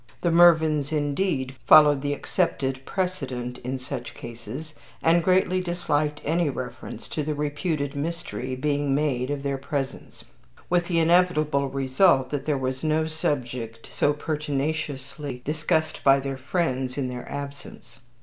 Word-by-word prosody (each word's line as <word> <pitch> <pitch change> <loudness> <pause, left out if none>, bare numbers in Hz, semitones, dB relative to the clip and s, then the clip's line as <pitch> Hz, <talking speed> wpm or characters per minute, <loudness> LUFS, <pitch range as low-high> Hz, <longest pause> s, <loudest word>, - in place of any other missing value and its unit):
The 170 - +2
Mervyns, 160 -4 +5
indeed, 145 -3 -1
followed 150 -2 +8
the 145 0 -1
accepted 135 -6 -1
precedent 135 -10 -3
in 130 +2 -3
such 130 -2 -6
cases, 120 +7 -8 0.3
and 165 +1 +4
greatly 185 0 +3
disliked 150 -4 -1
any 165 +1 +2
reference 125 -2 -6
to 155 - -2
the 150 +1 -2
reputed 145 0 -2
mystery 140 -6 -4
being 145 +1 0
made 135 -4 0
in 145 -1 -3
their 140 -1 -1
presence; 140 -1 -5 0.5
with 175 -1 +2
the 175 - 0
inevitable 160 -4 +3
result 135 +1 +3
that 145 -1 -3
there 150 -2 +2
was 130 +1 -3
no 155 0 +2
subject 125 -7 -3
so 145 - +3
pertinaciously 145 -3 -3
discussed 155 +1 0
by 135 0 +6
their 135 0 -3
friends 130 -2 -1
in 135 -2 -1
their 125 -1 -7
absence. 140 -4 -8
145 Hz, 140 wpm, -25 LUFS, 130-160 Hz, 0.5 s, followed